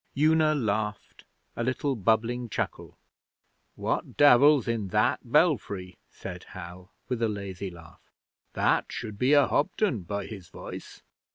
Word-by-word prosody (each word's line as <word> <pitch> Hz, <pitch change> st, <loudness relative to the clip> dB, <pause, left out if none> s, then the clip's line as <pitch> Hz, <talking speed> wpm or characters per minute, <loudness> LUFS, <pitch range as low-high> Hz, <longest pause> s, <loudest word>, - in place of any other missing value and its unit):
Una 155 Hz, +1 st, +4 dB
laughed 110 Hz, -4 st, -3 dB, 0.3 s
a 120 Hz, -, -2 dB
little 130 Hz, +2 st, -1 dB
bubbling 115 Hz, +3 st, 0 dB
chuckle. -, -, -4 dB, 0.8 s
'What -, -, -3 dB
Devil's 145 Hz, -1 st, +6 dB
in 115 Hz, -4 st, -1 dB
that 90 Hz, -, +2 dB
belfry?' 90 Hz, -2 st, +1 dB
said -, -, -8 dB
Hal, 90 Hz, 0 st, -10 dB, 0.2 s
with 125 Hz, -2 st, -2 dB
a 115 Hz, -, +2 dB
lazy 100 Hz, -2 st, -5 dB
laugh. 85 Hz, -3 st, -14 dB, 0.5 s
'That -, -, +1 dB
should 105 Hz, -3 st, -6 dB
be 130 Hz, +3 st, +3 dB
a 145 Hz, -2 st, +6 dB
Hobden 150 Hz, -, 0 dB
by 100 Hz, +3 st, -4 dB
his 100 Hz, -6 st, -9 dB
voice.' -, -, -10 dB
110 Hz, 130 wpm, -27 LUFS, 100-135 Hz, 0.8 s, Devil's